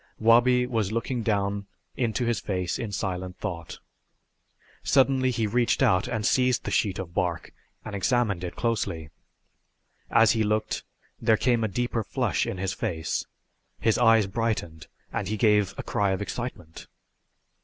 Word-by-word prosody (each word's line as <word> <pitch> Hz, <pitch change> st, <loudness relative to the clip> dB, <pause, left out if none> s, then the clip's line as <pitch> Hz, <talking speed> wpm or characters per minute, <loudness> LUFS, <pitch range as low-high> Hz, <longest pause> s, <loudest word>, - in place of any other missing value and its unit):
Wabi 120 Hz, +2 st, +4 dB
was 110 Hz, -5 st, -1 dB
looking 115 Hz, +2 st, -2 dB
down 100 Hz, -2 st, -1 dB, 0.3 s
into 120 Hz, 0 st, 0 dB
his 120 Hz, -3 st, 0 dB
face 90 Hz, 0 st, -2 dB
in 115 Hz, -4 st, -4 dB
silent 90 Hz, -2 st, -3 dB
thought. 85 Hz, -6 st, -5 dB, 1.0 s
Suddenly 135 Hz, -1 st, +3 dB
he 115 Hz, -3 st, 0 dB
reached 120 Hz, +3 st, +1 dB
out 90 Hz, 0 st, +3 dB
and 110 Hz, -2 st, -2 dB
seized 125 Hz, 0 st, +2 dB
the -, -, -4 dB
sheet 100 Hz, -5 st, +1 dB
of 90 Hz, -3 st, -6 dB
bark 90 Hz, -3 st, -2 dB, 0.3 s
and -, -, -6 dB
examined 100 Hz, -3 st, +1 dB
it 90 Hz, -, -5 dB
closely. 100 Hz, -9 st, -2 dB, 1.0 s
As 115 Hz, -, +5 dB
he 115 Hz, -, +1 dB
looked 110 Hz, +1 st, -1 dB, 0.4 s
there 110 Hz, -1 st, +4 dB
came 120 Hz, -1 st, +2 dB
a -, -, +2 dB
deeper 120 Hz, +2 st, -1 dB
flush -, -, -1 dB
in -, -, -3 dB
his 95 Hz, 0 st, -2 dB
face, 80 Hz, -8 st, -3 dB, 0.5 s
his 110 Hz, -, +2 dB
eyes 115 Hz, -3 st, +5 dB
brightened 95 Hz, -7 st, -3 dB, 0.3 s
and -, -, -2 dB
he 110 Hz, -, -2 dB
gave 105 Hz, -3 st, +3 dB
a -, -, -4 dB
cry 100 Hz, -1 st, 0 dB
of 95 Hz, -, -3 dB
excitement. 100 Hz, -9 st, -6 dB
110 Hz, 155 wpm, -26 LUFS, 95-120 Hz, 1.0 s, As